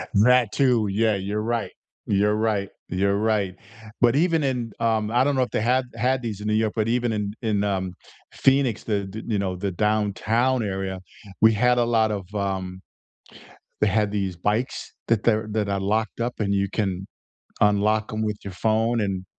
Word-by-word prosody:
That 120 +1 +5
too, 125 -6 +2
yeah, 110 +1 +2
you're 100 +2 -2
right. 115 +1 -2 0.3
You're 105 +1 +2
right. 105 -3 0 0.2
You're 100 +2 +1
right. 105 -4 0 0.5
But 120 +1 +5
even 165 -1 +2
in 125 -4 -1
um, 110 -2 +1
I 125 +2 +3
don't 145 0 +1
know 130 - +3
if - - -5
they - - 0
had 125 +3 +2
had 125 +3 +1
these 105 -3 -4
in 105 - -4
New 105 - +1
York, 110 -1 +1
but 110 -1 0
even 120 0 +1
in 105 -1 -2
in, 105 -2 +1
um, 95 -2 -1 0.4
Phoenix, 135 -4 +2
the 100 -3 -1
th 110 +3 -7
you 110 -3 0
know, 95 -2 -1
the 95 +1 -3
downtown 110 +5 +1
area, 95 -1 -3 0.4
we 110 0 +7
had 125 +3 +3
a 120 - +4
lot 110 -2 +2
of, 100 -3 -3
um, 95 -2 -3 1.0
they 105 - +3
had 105 +1 +1
these 95 -4 -2
bikes 105 +8 -2 0.2
that 115 -2 +2
they're 110 -2 +2
that 105 -1 -1
are 100 -1 0
locked 110 +3 -1
up 120 +1 -1
and 100 -2 0
you 100 0 +1
can 95 -2 -2 0.5
unlock 105 +1 +2
'em 110 - -2
with 105 -1 -2
your 100 - -6
phone, 110 +4 +1
and 95 -2 -2
105 Hz, 190 wpm, -24 LUFS, 100-115 Hz, 1.0 s, we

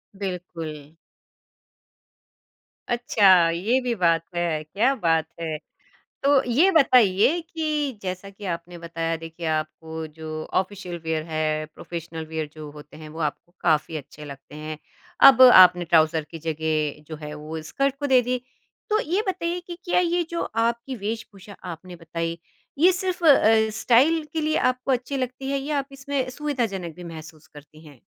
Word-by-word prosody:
बिल्कुल। 175 -6 -6 2.1
अच्छा, 190 -8 +5
ये 215 +10 +1
भी 245 -1 -1
बात 165 -1 +3
है। 165 -3 -1
क्या 210 - +1
बात 165 -5 +1 0.2
है! 160 -2 -3 0.7
तो 280 -1 +5
ये 330 +11 +5
बताइए 255 - +4
कि 305 -4 -2
जैसा 185 +1 -5
कि 200 +1 -11
आपने 175 +1 -12
बताया 165 0 -3
देखिए 165 +1 -7
आपको 160 +1 -4
जो 160 0 -8 0.3
ऑफ़िशियल 185 -2 -5
वियर 160 -1 -1
है, 155 -1 -1
प्रोफ़ेशनल 165 -1 -7
वियर 155 -1 -2
जो 155 -1 -9
होते 150 0 -13
हैं 155 -1 -10
वो - - -7
आपको 175 - -24
काफ़ी 160 -1 +1
अच्छे 145 +1 -10
लगते 140 +1 -11
हैं। 155 0 -6 0.5
अब 260 -1 +4 0.2
आपने 180 -1 +5
ट्राउज़र 160 -2 +3
की 165 - -6
जगह 155 -2 -1
जो 155 - -6
है 150 0 -6
वो 155 +1 -7
स्कर्ट 275 0 0
को 285 - -1
दे 250 - +7
दी। 255 - +1 0.5
तो 430 +1 +2
ये 385 +5 +2
बताइए 355 -1 -2
कि 345 - -6
क्या - - +4
ये 350 0 +1
जो - - -1 0.2
आपकी 235 +3 -2
वेशभूषा 215 -2 -6 0.2
आपने 180 +2 -11
बताई 165 0 -4 0.5
ये 370 - +8
सिर्फ़ 365 -2 -3
अ, 220 -6 +5
स्टाइल 300 +7 +4
के 320 - -1
लिए 310 0 +1 0.2
आपको 255 +2 -4
अच्छी 255 +2 -1
लगती 255 +1 -4
है 275 - 0
या 290 +1 -2
आप 275 - -5
इसमें 280 0 -1 0.2
सुविधाजनक 225 - -2
भी 180 - -10
महसूस 155 0 -12
करती 155 +2 -15
हैं? 140 -5 -16
180 Hz, 160 wpm, -24 LUFS, 160-260 Hz, 2.1 s, ये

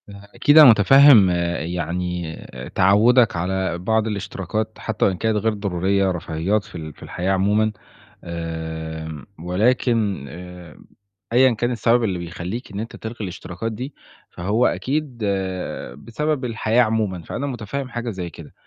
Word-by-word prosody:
فأكيد 105 +8 +1
أنا 150 -4 +11
مُتفهِّم 115 0 +7 0.3
يعني 90 -1 -3
آآ 65 0 -9
تعوُّدك 110 +5 +4
على 95 0 -1
بعض 110 +5 0
الاشتراكات 105 +1 -4
حتّى 110 -2 -1
وإن 95 -2 +1
كانت 110 +1 0
غير 110 +1 +1
ضرورية 95 -1 0
رفاهيات 90 +4 -1
في - - -15
ال 80 -2 -7
في - - -15
الحياة 90 +2 -2
عمومًا. 105 +3 +2 0.5
آمم 80 -2 -5
ولكن 105 - +1
آآ 90 -1 -11 0.5
أيًا 130 +1 +5
كان 120 +2 -1
السبب 120 +1 +2
اللي 95 -5 -1
بيخلّيك 90 +7 -6
إن 100 - -5
أنت 115 +2 -6
تلغي 115 +1 -7
الاشتراكات 95 +2 -5
دي، 130 +6 -6 0.4
فهو 105 +8 0
أكيد 140 -1 -1 0.8
بسبب 145 +4 -2
الحياة 115 0 +1
عمومًا، 110 -5 -1
فأنا 140 - -4
مٌتفهِّم 125 +1 -4
حاجة 120 0 -4
زي 90 -5 -5
كده. 80 -1 -13
100 Hz, 140 wpm, -22 LUFS, 90-115 Hz, 0.8 s, أنا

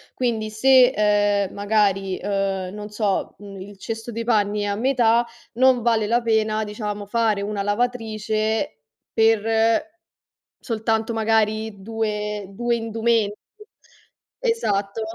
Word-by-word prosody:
Quindi, 225 -4 -1
se, 255 +3 +6
ehm, 205 -4 +1
magari, 200 -2 +1
ehm, 195 -1 -2
non 210 0 -7
so, 210 -2 -1
uhm, 200 -1 -10
il 200 +1 -10
cesto 225 +3 -6
dei 230 0 -4
panni 210 -3 +1
è 205 - -1
a 200 - -1
metà, 235 -1 +2 0.3
non 255 -1 +3
vale 225 -3 +2
la 240 +2 +2
pena, 220 -1 +1
diciamo, 210 -1 -5
fare 220 -1 +1
una 205 -1 -3
lavatrice 220 -3 -1 0.3
per 225 -1 +3 1.2
soltanto 225 0 -1
magari 220 -2 0
due 210 -1 -3
due 235 +5 -1
indumenti. 225 -2 0 1.1
Esatto, 205 - 0
215 Hz, 120 wpm, -22 LUFS, 205-230 Hz, 1.2 s, se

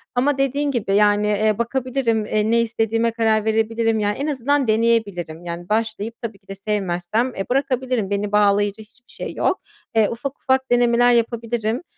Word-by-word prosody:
Ama 275 +3 +2
dediğin 280 +2 0
gibi, 205 -6 -1
yani, 210 0 +3
eee, 210 0 +1
bakabilirim, 235 -2 -1
eee, 215 +1 0
ne 235 0 +4
istediğime 225 0 0
karar 220 -2 +1
verebilirim. 225 0 +1
Yani, 205 0 0
en 280 - -2
azından 285 -1 0
deneyebilirim. 210 -7 0
Yani, 175 +1 -6
başlayıp 220 +1 -2
tabii 225 -4 -6
ki 195 - -39
de 195 - -7
sevmezsem, 200 +3 -1
eee, 195 - -3
bırakabilirim, 255 -5 0
beni 205 0 -2
bağlayıcı 205 0 +2
hiçbir 240 +3 -19
şey - - -6
yok. - - 0 0.3
Eee, 220 -2 +4
ufak 265 +4 -5
ufak 260 -1 0
denemeler 245 0 +4
yapabilirim. 235 +1 -1
225 Hz, 165 wpm, -21 LUFS, 210-245 Hz, 0.3 s, ne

